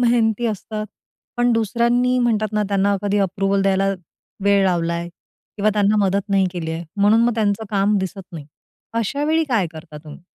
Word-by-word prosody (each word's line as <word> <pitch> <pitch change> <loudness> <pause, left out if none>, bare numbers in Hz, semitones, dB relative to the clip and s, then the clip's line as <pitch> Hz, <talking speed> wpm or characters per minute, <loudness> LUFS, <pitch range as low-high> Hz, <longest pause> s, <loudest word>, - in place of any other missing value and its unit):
मेहनती 235 -1 +2
असतात, 215 0 -4 0.5
पण 245 0 +2
दुसऱ्यांनी 235 +3 +1
म्हणतात 215 -3 0
ना, 210 0 +1
त्यांना 200 0 +1
कधी 205 0 0
अप्रूव्हल 195 0 0
द्यायला 195 0 +2 0.6
वेळ 200 -1 +4
लावलाय 170 -2 -1 0.5
किंवा 215 +1 +2
त्यांना 205 0 +2
मदत 195 +1 -1
नाही 195 -1 +2
केली 170 -3 -4
आहे, 165 +1 -4
म्हणून 205 +3 +4
मग 240 - +1
त्यांचं 215 -1 0
काम 205 0 +2
दिसत 190 +1 -4
नाही. 155 -4 -8 0.5
अशावेळी 290 +8 0
काय 225 -8 +1
करता 160 -1 -11
तुम्ही? 150 +2 -11
205 Hz, 160 wpm, -20 LUFS, 195-225 Hz, 0.6 s, वेळ